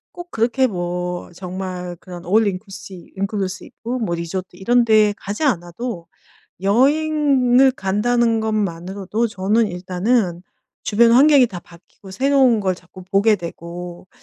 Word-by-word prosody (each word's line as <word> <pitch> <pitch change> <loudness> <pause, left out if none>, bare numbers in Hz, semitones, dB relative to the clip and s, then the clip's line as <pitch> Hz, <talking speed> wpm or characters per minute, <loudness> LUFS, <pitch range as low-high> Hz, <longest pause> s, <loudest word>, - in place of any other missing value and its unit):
꼭 350 0 -9
그렇게 240 +4 +1
뭐 180 -4 -3
정말 180 -1 -6
그런 175 -2 -10
올인클루시 195 -2 -2
인클루시브 200 +2 -4
뭐 175 -6 -1
리조트 175 +2 -5
이런 240 +6 +2
데 215 -2 +4
가지 205 +9 -5
않아도 180 - -2 0.5
여행을 270 +3 +3
간다는 230 +2 +1
것만으로도 200 +1 -2
저는 210 +3 +1
일단은 180 +1 -1 0.4
주변 230 +2 +4
환경이 275 +1 +6
다 185 -6 -8
바뀌고 175 +3 -17
새로운 260 +2 +3
걸 190 -3 0
자꾸 180 +1 -14
보게 200 +3 +3
되고 175 0 -8
200 Hz, 280 characters per minute, -20 LUFS, 180-235 Hz, 0.5 s, 환경이